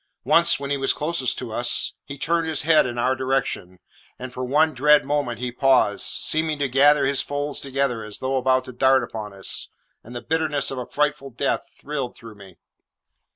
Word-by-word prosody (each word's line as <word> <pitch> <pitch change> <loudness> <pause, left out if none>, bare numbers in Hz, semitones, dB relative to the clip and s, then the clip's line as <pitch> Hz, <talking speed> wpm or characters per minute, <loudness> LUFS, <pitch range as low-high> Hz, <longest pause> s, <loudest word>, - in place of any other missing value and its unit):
Once, 170 -3 +3
when 140 0 -5
he 140 - +1
was 135 0 +1
closest 150 -4 -1
to 120 -3 -6
us, 120 +2 0
he 140 - -8
turned 165 +3 0
his 160 -1 -1
head 155 -3 +4
in 120 -1 -5
our 130 +2 +1
direction, 130 -8 -2 0.4
and 130 0 -8
for 130 - -5
one 150 +5 +2
dread 150 +3 +4
moment 140 -5 -1
he 125 +2 -4
paused, 125 -5 +2
seeming 155 -1 -1
to 145 -1 0
gather 140 +2 +4
his 140 0 +1
folds 145 0 -4
together 135 -4 -1
as 105 -1 -7
though 130 +1 -1
about 130 0 +2
to - - -8
dart 130 +1 +3
upon 110 -3 -6
us, 95 -1 -2 0.3
and 120 +2 -11
the - - -3
bitterness 155 -3 0
of 135 - -4
a 125 - -6
frightful 150 -1 -1
death 135 +2 -2
thrilled 140 -4 -4
through 115 -2 -12
me. 100 -4 -15
135 Hz, 200 wpm, -23 LUFS, 125-145 Hz, 0.4 s, head